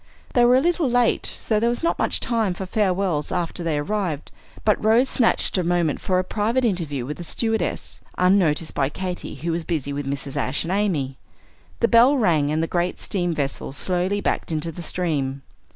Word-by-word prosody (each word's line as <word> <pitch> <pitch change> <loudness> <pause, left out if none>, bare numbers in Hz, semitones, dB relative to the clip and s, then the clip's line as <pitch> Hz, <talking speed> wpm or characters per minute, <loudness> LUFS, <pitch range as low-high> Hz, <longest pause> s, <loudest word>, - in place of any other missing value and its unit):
They 245 - +4
were 245 +1 +6
a 260 - +4
little 340 -3 +1
late, 245 -1 +2
so 215 -2 -1
there 235 +2 +2
was 240 +6 -3
not 335 - +1
much - - +1
time 220 -6 0
for 190 - -5
farewells 185 -6 0
after 175 -1 -2
they 160 -3 0
arrived; 160 -1 -2 0.3
but 210 -1 +2
Rose 225 +5 +4
snatched 230 -5 +2
a - - 0
moment 170 -3 0
for 185 - +1
a 185 - +2
private 225 +6 0
interview 160 - -1
with 150 +3 -5
the 175 - -7
stewardess, 220 +1 -2 0.2
unnoticed 180 -4 +2
by 135 -1 +1
Katy, 180 +3 -5
who 170 - -3
was 165 0 -2
busy 150 -4 -2
with 145 -1 -4
Mrs. 140 0 -4
Ashe 130 +3 -1
and 170 - -3
Amy. 160 -10 -1 0.6
The - - +5
bell 245 +5 +6
rang, 160 - +2
and 155 +1 +1
the - - +2
great 175 +1 -1
steam 175 -4 -1
vessel 140 -2 -3
slowly 185 +5 0
backed - - -1
into 160 +1 -2
the 170 - -8
stream. 145 -6 -2
180 Hz, 200 wpm, -23 LUFS, 155-215 Hz, 0.6 s, were